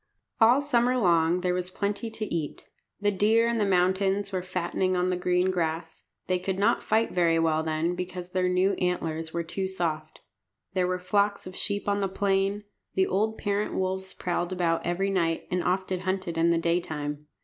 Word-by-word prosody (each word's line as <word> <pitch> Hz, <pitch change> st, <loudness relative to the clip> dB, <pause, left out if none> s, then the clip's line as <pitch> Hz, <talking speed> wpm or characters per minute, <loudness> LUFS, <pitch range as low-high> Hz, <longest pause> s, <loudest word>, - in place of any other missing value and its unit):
All 245 Hz, +5 st, +5 dB
summer 250 Hz, -3 st, +2 dB
long 170 Hz, -4 st, +3 dB
there 180 Hz, 0 st, +1 dB
was 180 Hz, 0 st, -2 dB
plenty 205 Hz, +4 st, -2 dB
to 220 Hz, -1 st, -4 dB
eat. 160 Hz, -3 st, -4 dB, 0.3 s
The 205 Hz, 0 st, +2 dB
deer 220 Hz, +4 st, +3 dB
in 235 Hz, -1 st, 0 dB
the 205 Hz, -, +2 dB
mountains 190 Hz, +2 st, +2 dB
were 185 Hz, -1 st, -1 dB
fattening 185 Hz, +1 st, -1 dB
on 180 Hz, +1 st, +1 dB
the -, -, +1 dB
green 180 Hz, +1 st, +1 dB
grass. 165 Hz, -2 st, -3 dB, 0.2 s
They 185 Hz, -1 st, 0 dB
could 190 Hz, +1 st, -2 dB
not 215 Hz, +4 st, +2 dB
fight 220 Hz, +1 st, +1 dB
very 170 Hz, -2 st, +3 dB
well 160 Hz, -1 st, +2 dB
then, 160 Hz, +2 st, -1 dB
because 180 Hz, 0 st, -6 dB
their 185 Hz, 0 st, +1 dB
new 185 Hz, +2 st, +2 dB
antlers 165 Hz, -3 st, -1 dB
were 170 Hz, 0 st, -2 dB
too 190 Hz, +3 st, -3 dB
soft. 160 Hz, -4 st, -3 dB, 0.5 s
There 180 Hz, -1 st, +1 dB
were 185 Hz, 0 st, 0 dB
flocks 200 Hz, +2 st, 0 dB
of 185 Hz, -, -8 dB
sheep 205 Hz, 0 st, -2 dB
on 200 Hz, 0 st, +1 dB
the 195 Hz, -1 st, 0 dB
plain. 195 Hz, +1 st, 0 dB, 0.3 s
The 190 Hz, -, +3 dB
old 215 Hz, +4 st, 0 dB
parent 205 Hz, 0 st, -1 dB
wolves 190 Hz, 0 st, -2 dB
prowled 175 Hz, 0 st, -2 dB
about 170 Hz, -3 st, 0 dB
every 190 Hz, +3 st, 0 dB
night, 165 Hz, -4 st, 0 dB
and 180 Hz, -1 st, 0 dB
often 185 Hz, 0 st, 0 dB
hunted 185 Hz, -2 st, -2 dB
in 165 Hz, +1 st, +3 dB
the 170 Hz, -, +3 dB
daytime. 155 Hz, -3 st, -2 dB
185 Hz, 190 wpm, -27 LUFS, 170-200 Hz, 0.5 s, All